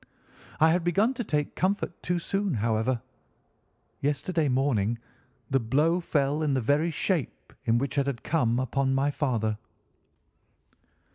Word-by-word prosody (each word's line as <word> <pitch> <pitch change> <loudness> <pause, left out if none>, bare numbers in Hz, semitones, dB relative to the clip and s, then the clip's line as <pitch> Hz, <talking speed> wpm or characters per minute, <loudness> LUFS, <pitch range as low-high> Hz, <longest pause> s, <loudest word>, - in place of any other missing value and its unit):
I 160 +1 +6
had 175 +1 +1
begun 200 +9 +2
to 240 - -3
take 150 -7 -1
comfort 185 -1 -1
too 180 0 0
soon, 195 -1 -1
however; 115 +2 0 1.0
yesterday 150 +2 0
morning 120 -4 +1 0.5
the 135 - +4
blow 150 +9 +2
fell 150 -3 0
in 145 -3 +1
the - - +2
very 145 +7 +2
shape 165 - -2
in 115 +1 +3
which 140 +3 -1
it 140 - 0
had 130 -4 -3
come 125 -8 +1
upon 135 +1 0
my 140 +2 +2
father." 115 -8 -1
140 Hz, 140 wpm, -27 LUFS, 125-165 Hz, 1.0 s, I